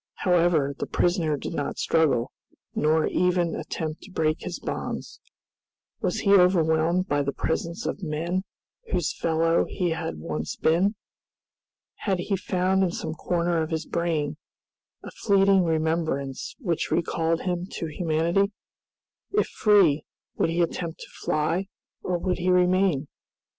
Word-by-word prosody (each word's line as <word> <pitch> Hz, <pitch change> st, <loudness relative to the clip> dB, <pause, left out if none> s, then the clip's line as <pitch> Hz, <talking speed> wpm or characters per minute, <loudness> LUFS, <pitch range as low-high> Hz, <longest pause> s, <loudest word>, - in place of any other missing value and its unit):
However, 170 Hz, -6 st, +3 dB
the -, -, -2 dB
prisoner 170 Hz, -4 st, +1 dB
did -, -, -5 dB
not 145 Hz, -, -3 dB
struggle, 155 Hz, -8 st, +2 dB, 0.4 s
nor 155 Hz, +1 st, +2 dB
even 180 Hz, -2 st, +1 dB
attempt 155 Hz, -1 st, -4 dB
to 200 Hz, -, -13 dB
break 155 Hz, -3 st, 0 dB
his 180 Hz, -, -4 dB
bonds. -, -, -5 dB, 0.8 s
Was -, -, 0 dB
he 200 Hz, -2 st, +4 dB
overwhelmed 175 Hz, -1 st, +4 dB
by 145 Hz, -3 st, +1 dB
the 140 Hz, 0 st, -1 dB
presence 170 Hz, +4 st, -2 dB
of -, -, -3 dB
men 170 Hz, +3 st, -2 dB, 0.5 s
whose -, -, 0 dB
fellow 165 Hz, 0 st, +2 dB
he 180 Hz, -3 st, -1 dB
had 160 Hz, -, -3 dB
once 75 Hz, -1 st, -4 dB
been? 185 Hz, +7 st, +2 dB, 1.0 s
Had 195 Hz, -3 st, 0 dB
he 195 Hz, +3 st, -1 dB
found 185 Hz, 0 st, +1 dB
in 190 Hz, -, +3 dB
some 160 Hz, -2 st, -4 dB
corner 170 Hz, +1 st, 0 dB
of 160 Hz, -, -2 dB
his 160 Hz, -1 st, -2 dB
brain 160 Hz, -3 st, -1 dB, 0.7 s
a -, -, -8 dB
fleeting 195 Hz, -2 st, +3 dB
remembrance 160 Hz, -4 st, -1 dB
which 175 Hz, -, -2 dB
recalled 165 Hz, -1 st, 0 dB
him 180 Hz, -1 st, -2 dB
to -, -, -3 dB
humanity? 170 Hz, +5 st, +1 dB, 0.8 s
If 415 Hz, -, +1 dB
free, 190 Hz, -, +4 dB, 0.3 s
would -, -, +1 dB
he 170 Hz, +1 st, +2 dB
attempt 170 Hz, 0 st, -4 dB
to -, -, -9 dB
fly, 165 Hz, +5 st, 0 dB, 0.3 s
or 180 Hz, -1 st, -1 dB
would 180 Hz, +1 st, -1 dB
he 180 Hz, +1 st, 0 dB
remain? 180 Hz, -4 st, +3 dB
170 Hz, 140 wpm, -26 LUFS, 160-180 Hz, 1.0 s, he